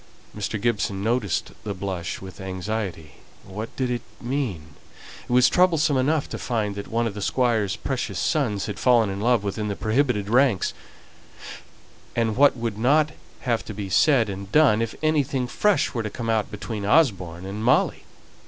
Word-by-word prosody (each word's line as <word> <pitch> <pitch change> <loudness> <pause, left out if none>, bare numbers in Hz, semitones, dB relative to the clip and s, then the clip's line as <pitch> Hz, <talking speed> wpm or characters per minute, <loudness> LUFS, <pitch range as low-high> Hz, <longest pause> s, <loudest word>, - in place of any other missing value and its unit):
Mr. 105 +1 -3
Gibson 100 -3 -1
noticed 115 -5 0
the 100 -2 -4
blush 90 -3 -4
with 95 0 -10
anxiety. 95 -4 -4 0.3
What 105 +4 -7
did 130 -2 -1
it 120 -1 -2 0.2
mean? 120 - -3 0.6
It - - -4
was 125 +1 +6
troublesome 165 -5 +3
enough 145 +3 +1
to - - -5
find 110 -5 -1
that 100 0 -6
one 115 +1 0
of 115 - -2
the 105 - -6
Squire's 110 -3 +1
precious 115 -4 -3
sons 105 - 0
had 105 - -5
fallen 120 -5 +4
in 100 +1 -5
love 120 -2 +2
within 105 +1 -3
the 100 - -2
prohibited 110 -2 0
ranks; 120 -3 +2 1.4
and 115 -2 +1
what 140 0 +5
would 115 -3 -3
not 150 +6 +3 0.3
have 120 -3 0
to 105 - -7
be 100 -1 -5
said 125 +2 +4
and 100 0 -6
done 130 -6 +5
if 115 -1 -3
anything 145 -4 +1
fresh 205 +11 +1
were 115 - -1
to 110 - -3
come 115 +2 -3
out 110 -2 0
between 105 0 -5
Osborne 95 - +2
and 100 +3 -5
Molly? 125 - +2
110 Hz, 170 wpm, -24 LUFS, 100-125 Hz, 1.4 s, was